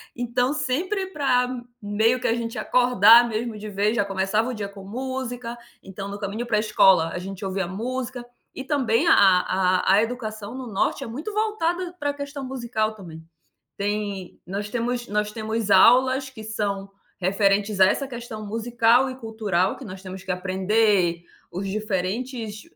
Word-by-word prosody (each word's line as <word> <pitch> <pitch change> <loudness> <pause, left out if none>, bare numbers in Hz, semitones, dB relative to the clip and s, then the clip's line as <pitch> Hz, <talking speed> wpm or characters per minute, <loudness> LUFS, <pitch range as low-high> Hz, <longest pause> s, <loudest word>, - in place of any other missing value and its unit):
Então 245 +3 0
sempre 340 +8 -1
para 270 -8 +1 0.3
meio 220 +4 +1
que - - -1
a - - +3
gente 230 -1 -4
acordar 240 -1 +6
mesmo 225 0 -3
de 215 +1 -7
vez, 205 +3 0
já 205 - +1
começava 195 +4 0
o - - -3
dia 205 -3 -4
com 200 -1 -12
música, 245 +1 -5 0.3
então 195 +1 -7
no 200 - -6
caminho 210 +4 -4
para 215 -3 +2
escola 190 -6 +4
a 180 - -5
gente 195 +2 -7
ouvia 190 -1 -2
música. 245 +5 -4 0.3
E 265 - -5
também 270 0 +1
a - - +7
a 185 0 +3
a 210 - +5
educação 220 -1 -5
no 260 -2 -6
Norte 195 - 0
é - - -6
muito 295 - -6
voltada 365 -5 -1
para 285 0 -1
questão 285 0 -6
musical, 235 -4 -2
também. 165 -5 -11 0.6
Tem 205 -2 -3
nós 200 +3 -4
temos 240 +1 -2
nós 210 0 -1
temos 220 -1 -3
aulas 260 +5 +5
que 220 -4 -10
são 200 -2 -3 0.3
referentes 200 +1 +1
a 190 - +9
essa 275 +8 0
questão 235 -4 -7
musical 235 +3 +2
e 255 - -7
cultural, 220 -6 -1
que 270 - -10
nós 190 -2 -9
temos 185 0 -8
que 190 - -7
aprender 185 -1 +1 0.3
os 190 +3 -4
diferentes 215 +3 -3
220 Hz, 165 wpm, -24 LUFS, 195-250 Hz, 0.6 s, a